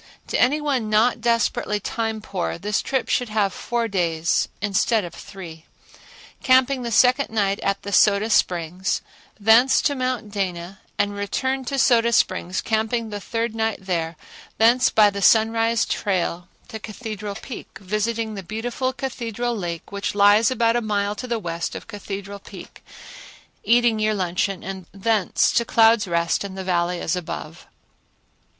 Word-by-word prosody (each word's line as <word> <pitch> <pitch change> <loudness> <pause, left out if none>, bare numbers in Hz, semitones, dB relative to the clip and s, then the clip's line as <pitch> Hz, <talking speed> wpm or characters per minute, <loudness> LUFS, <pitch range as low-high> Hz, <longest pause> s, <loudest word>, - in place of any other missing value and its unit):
To - - 0
any 280 +5 +3
one 270 -7 -1
not 225 +3 +2
desperately 230 -2 0
time 220 +1 -3
poor 190 -5 -3
this 205 +3 -1
trip 265 -1 -1
should 245 -2 0
have 205 -3 0
four 235 -1 -2
days 170 -5 0
instead 205 +1 +1
of 175 - -9
three; 165 -5 -10 0.8
camping 260 0 +3
the 235 -1 -4
second 255 +5 +4
night 200 -3 0
at 200 0 -1
the 200 - -5
Soda 210 +2 +4
Springs; 180 -1 0 0.4
thence 225 +5 +5
to 290 - +2
Mount 255 -5 -3
Dana 185 -2 -4 0.2
and 205 0 0
return 260 +6 -2
to 275 - -3
the - - -3
Soda 235 -3 +4
Springs, 185 -4 +1
camping 220 0 -1
the 205 - -4
third 230 +2 -3
night 225 -1 -1
there; 170 -3 -2 0.4
thence 240 +3 +4
by 210 -2 +5
the 200 0 -5
Sunrise 225 +2 +3
trail 180 -3 -2 0.2
to 220 -2 -6
Cathedral 215 -2 -6
Peak, 225 +3 -9
visiting 215 +3 -2
the 200 - -6
beautiful 240 +6 -3
Cathedral 240 -3 -3
lake 175 -4 -5
which 200 0 -3
lies 205 +2 +5
about 235 -3 +1
a 240 - +1
mile 205 -2 -1
to 250 +4 -7
the 235 -1 -1
west 170 -5 -4
of - - -7
Cathedral 200 -2 -7
Peak, - - -12 0.8
eating 235 -2 +3
your 215 0 +1
luncheon, 185 0 -1
and 190 -1 -7
thence 205 0 +1
to 235 - +2
Clouds' 225 -2 +4
Rest 170 +1 0
and 195 -1 -7
the 190 - -4
Valley 175 -1 0
as 165 - -1
above. 180 -2 -7
215 Hz, 160 wpm, -22 LUFS, 195-235 Hz, 0.8 s, thence